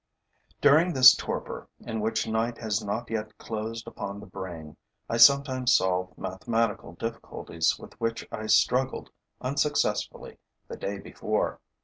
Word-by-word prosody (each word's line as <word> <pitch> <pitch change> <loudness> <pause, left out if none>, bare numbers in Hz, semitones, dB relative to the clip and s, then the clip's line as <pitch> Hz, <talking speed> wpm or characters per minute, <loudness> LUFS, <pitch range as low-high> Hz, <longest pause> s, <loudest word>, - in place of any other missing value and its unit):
During 160 +5 +5
this 130 -1 +9
torpor, - - -5
in 115 -2 -4
which 110 +1 0
night 115 +1 -1
has 110 -2 -2
not 110 +3 -4
yet 110 -1 -4
closed 115 +1 -5
upon 100 0 -6
the 105 - -10
brain, 85 -5 -8 0.3
I 115 - -1
sometimes 130 0 +5
solve 90 0 0
mathematical 105 0 -2
difficulties 85 -5 -2
with - - -12
which 115 0 -2
I 110 0 -5
struggled 125 +5 +2 0.3
unsuccessfully 140 +3 -1 0.3
the - - -7
day 100 +1 -4
before. 95 - -2
110 Hz, 130 wpm, -27 LUFS, 100-120 Hz, 0.3 s, this